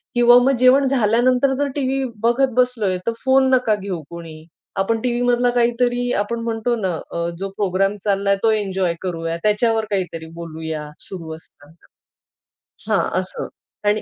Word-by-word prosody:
किंवा 240 0 +7
मग 270 +1 +3
जेवण 255 +2 +6
झाल्यानंतर 255 +1 +3
जर 285 - +1
टीव्ही 270 -1 0 0.2
बघत 250 +3 +3
बसलोय 240 -7 +1
तर - - +3
फोन 265 0 +4
नका 245 -4 +3
घेऊ 195 -4 -5
कोणी, 165 -2 -10 0.3
आपण 225 +4 0
टीव्ही 240 0 -1
मधला 245 0 +2
काहीतरी 245 +1 +1
आपण 230 +3 -2
म्हणतो 230 +1 -1
ना, 185 -2 0 0.2
अ, 170 0 -2
जो 195 +1 -4
प्रोग्राम 195 0 +1
चालला 200 -1 +1
तो 225 - +4
एन्जॉय 190 -5 0
करूया 165 -2 -3
त्याच्यावर 220 +1 +2
काहीतरी 180 -5 -3
बोलूया 160 -2 -6 0.2
सुरू 165 -4 -7
असताना. 160 0 -17 1.0
हां, - - +1
असं - - -5 0.4
आणि 210 +1 +1
215 Hz, 150 wpm, -20 LUFS, 185-245 Hz, 1.0 s, किंवा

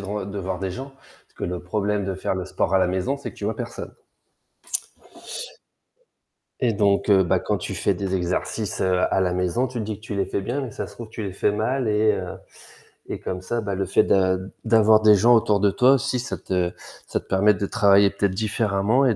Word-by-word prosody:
de 100 - -8
ren 105 -1 -3
de 100 0 -6
voir 95 -1 -3
des 95 -1 -3
gens, 135 +7 -7
parce 135 - -25
que - - -4
le 90 0 -3
problème 105 +2 -1
de 95 - -2
faire 95 - -2
le 95 -1 -4
sport 95 - -1
à - - +6
la 95 - +3
maison, 95 +10 -1
c'est 140 - -6
que - - -22
tu - - -6
vois - - -1
personne - - -6 2.7
et 120 -3 +2
donc 100 -1 +2
heu, 95 -1 +6
bah, 90 - +2
quand - - -1
tu - - -5
fais - - +1
des 95 -1 -3
exercices 90 +3 -2
à 95 0 +2
la 90 -1 +1
maison, 90 +8 0
tu 125 -1 -6
te 110 - -2
dis 105 -1 -4
que 110 - -13
tu 105 - -4
les 100 - +1
fais - - -2
bien, 120 +8 -2
mais 125 - -5
ça - - -5
se 100 - -14
trouve 115 +2 -8
que - - -25
tu 115 - -5
les 100 -3 -4
fais 100 +2 +1
mal 120 +3 -1
et 105 0 +3
heu - - -4 0.8
et - - -4
comme 90 0 -5
ça, 120 +5 -2
bah, 100 -2 -3
le 95 0 -1
fait 95 - +3
d'a 95 -1 +3 0.3
d'avoir 110 -1 +5
des 105 -1 +7
gens 120 +5 +5
autour 105 -2 +3
de 100 0 +3
toi 130 +5 +5
aussi, 135 -1 0
ça 125 - -4
te 90 -2 -1 0.4
ça - - -1
te - - -18
permet 100 +2 +4
de 100 - -2
travailler 100 0 +4
peut-être 100 -1 0
différemment 110 +3 +1
et 120 -5 +3
100 Hz, 240 wpm, -23 LUFS, 95-110 Hz, 2.7 s, des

